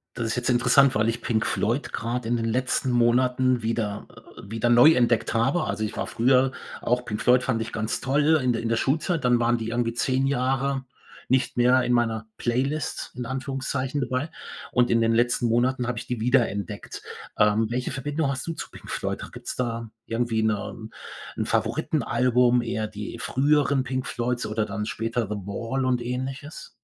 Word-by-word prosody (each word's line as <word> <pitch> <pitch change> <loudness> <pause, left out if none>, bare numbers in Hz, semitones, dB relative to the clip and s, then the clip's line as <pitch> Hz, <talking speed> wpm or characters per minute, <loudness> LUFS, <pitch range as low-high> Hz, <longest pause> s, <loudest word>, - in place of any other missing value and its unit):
Das 115 - -2
ist 115 - -1
jetzt 125 0 -1
interessant, 125 +2 +5
weil 105 +1 +2
ich 115 +1 -1
Pink 115 -1 0
Floyd 120 +7 -1
grad 120 +1 -3
in 120 +1 +1
den 115 - -1
letzten 125 +3 0
Monaten 125 +1 +3
wieder, 110 -2 -2 0.3
äh - - -9
wieder 115 +1 0
neu 120 +6 +8
entdeckt 120 -5 +2
habe. 130 +9 +2
Also, 110 - -2
ich 105 - -6
war - - -2
früher 130 +2 +3 0.3
auch 125 +1 0
Pink 105 -3 -4
Floyd 125 +1 +4
fand 125 -4 0
ich 115 - -4
ganz 110 0 -2
toll 150 +4 +3
in 125 - +2
der 115 - -1
in 115 - -2
der 115 - +1
Schulzeit. 155 +6 0
Dann 125 -1 +3
waren 120 0 +2
die 115 -1 -4
irgendwie 115 0 -1
10 130 +2 +1
Jahre 135 0 0 0.5
nicht 130 0 +1
mehr 125 +1 +4
in 125 0 +1
meiner 115 -2 +1
Playlist 135 +6 -2
in 125 0 -4
Anführungszeichen 135 +1 -3
dabei 130 +4 -2 0.4
und 125 -1 +3
in 115 - +3
den 115 0 +2
letzten 120 +1 +2
Monaten 125 +2 +1
habe 120 -1 -2
ich 125 - -5
die 125 -2 -3
wiederentdeckt. 115 -5 -1 0.4
Ähm, 105 +1 +4
welche 125 +1 -2
Verbindung 145 +2 -2
hast 135 -1 -3
du - - -1
zu 160 - -7
Pink - - -13
Floyd? - - -3
Gibt's - - -7
da 115 -2 -3 0.2
irgendwie 115 -1 0
'ne 110 +1 -2 0.5
'n - - -1
Favoritenalbum, 125 0 +2
eher 110 -2 -2
die 105 -1 -7
früheren 140 0 +2
Pink 130 0 -2
Floyds 125 0 -2
oder 110 0 -1
dann 105 +1 -4
später 115 +2 -2
The 105 - -2
Wall 115 +6 -2
und 125 -1 +1
Ähnliches? 130 +4 -5
120 Hz, 190 wpm, -25 LUFS, 115-130 Hz, 0.5 s, neu